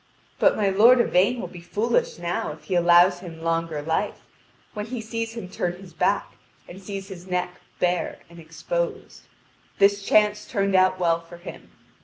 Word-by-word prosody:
But -, -, +4 dB
my 205 Hz, -, +1 dB
lord 230 Hz, +6 st, +6 dB
Yvain 235 Hz, +2 st, +2 dB
will -, -, -4 dB
be 175 Hz, -, -11 dB
foolish 220 Hz, +7 st, -1 dB
now 170 Hz, -3 st, -3 dB
if 155 Hz, -, -16 dB
he 190 Hz, -, -4 dB
allows 175 Hz, +1 st, +5 dB
him 165 Hz, -3 st, -10 dB
longer 165 Hz, -2 st, -1 dB
life, 165 Hz, +6 st, -2 dB, 0.5 s
when 210 Hz, 0 st, -5 dB
he 245 Hz, +1 st, -5 dB
sees 225 Hz, +1 st, -4 dB
him 195 Hz, -, -6 dB
turn 180 Hz, -1 st, -2 dB
his 180 Hz, -1 st, -13 dB
back, 195 Hz, +4 st, 0 dB, 0.3 s
and 190 Hz, +2 st, -11 dB
sees 195 Hz, 0 st, -7 dB
his 185 Hz, -1 st, -10 dB
neck 180 Hz, -1 st, -3 dB, 0.2 s
bare 180 Hz, -1 st, 0 dB
and 170 Hz, 0 st, -14 dB
exposed; -, -, -5 dB, 0.5 s
this 200 Hz, 0 st, +4 dB
chance 210 Hz, +1 st, +2 dB
turned 200 Hz, -3 st, 0 dB
out 185 Hz, 0 st, +4 dB
well 170 Hz, -2 st, +2 dB
for 170 Hz, +1 st, -13 dB
him. 175 Hz, -, -11 dB
185 Hz, 175 wpm, -24 LUFS, 175-210 Hz, 0.5 s, lord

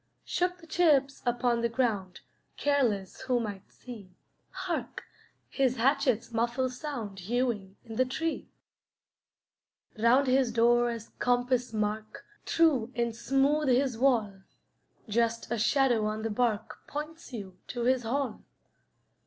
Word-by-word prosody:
Shook 360 Hz, 0 st, 0 dB
the 330 Hz, -, -14 dB
chips 300 Hz, -5 st, +2 dB
upon 240 Hz, -1 st, +1 dB
the 235 Hz, -, +1 dB
ground, 220 Hz, -7 st, -1 dB, 0.4 s
Careless 240 Hz, -10 st, 0 dB
who 255 Hz, -2 st, +1 dB
might 205 Hz, -4 st, -6 dB
see. 225 Hz, -7 st, -11 dB, 0.4 s
Hark! 375 Hz, -2 st, -4 dB, 0.4 s
his 260 Hz, -2 st, +1 dB
hatchet's 255 Hz, -2 st, +1 dB
muffled 240 Hz, +3 st, 0 dB
sound 245 Hz, -8 st, -5 dB
Hewing 210 Hz, -1 st, -1 dB
in 225 Hz, -1 st, -8 dB
the 255 Hz, -, +4 dB
tree. 320 Hz, +6 st, -3 dB, 1.5 s
Round 245 Hz, +5 st, +5 dB
his 255 Hz, -2 st, +3 dB
door 240 Hz, +1 st, +4 dB
as 230 Hz, -2 st, -6 dB
compass 245 Hz, 0 st, +1 dB
mark, 215 Hz, 0 st, -3 dB, 0.2 s
True 275 Hz, -8 st, +3 dB
and 235 Hz, -2 st, -1 dB
smooth 275 Hz, +5 st, +2 dB
his 255 Hz, 0 st, +2 dB
wall; 225 Hz, -6 st, +1 dB, 0.7 s
Just 230 Hz, +2 st, 0 dB
a 235 Hz, -, 0 dB
shadow 235 Hz, -1 st, +3 dB
on 215 Hz, +1 st, -3 dB
the 225 Hz, -, -1 dB
bark 220 Hz, -1 st, -1 dB
Points 305 Hz, +1 st, -6 dB
you 195 Hz, -6 st, -8 dB
to 240 Hz, -, -4 dB
his 255 Hz, +1 st, +3 dB
hall. 250 Hz, 0 st, -2 dB
240 Hz, 130 wpm, -29 LUFS, 225-270 Hz, 1.5 s, Round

